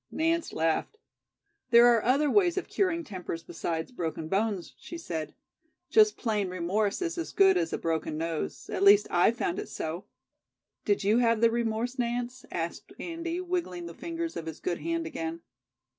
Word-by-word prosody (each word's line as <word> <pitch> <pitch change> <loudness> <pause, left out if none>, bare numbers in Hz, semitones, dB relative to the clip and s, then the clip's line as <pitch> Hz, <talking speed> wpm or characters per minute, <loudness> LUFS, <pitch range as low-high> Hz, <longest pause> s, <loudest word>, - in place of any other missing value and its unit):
Nance 330 +1 0
laughed. 165 - 0 0.7
"There 235 0 +8
are 235 -2 +5
other 275 +5 +3
ways 355 +3 +3
of 380 - -2
curing 350 -4 0
tempers 180 - -6
besides 165 +2 -4
broken 160 -7 -4
bones," 200 -1 -1
she 340 - -8
said. 165 - -5 0.6
"Just 430 -1 +5
plain 210 -5 -1
remorse 195 - 0
is 340 0 -2
as 335 - -4
good 385 -1 +5
as 340 -2 0
a - - -1
broken 160 -1 -2
nose; 165 0 -3
at - - -2
least 200 +1 +7
I've 180 +7 +3
found 175 - -1
it - - -6
so." 160 +4 -4 0.8
"Did 205 -1 +1
you 210 +4 +4
have 230 -2 +3
the 230 0 +5
remorse, 235 +2 -1
Nance?" 245 +2 -2
asked - - -4
Andy, 335 +1 -4
wiggling 345 - -3
the 170 - -7
fingers 335 - -4
of 165 - -5
his 160 - -6
good 175 - -2
hand 335 0 -2
again. 165 - -4
230 Hz, 175 wpm, -29 LUFS, -, 0.8 s, There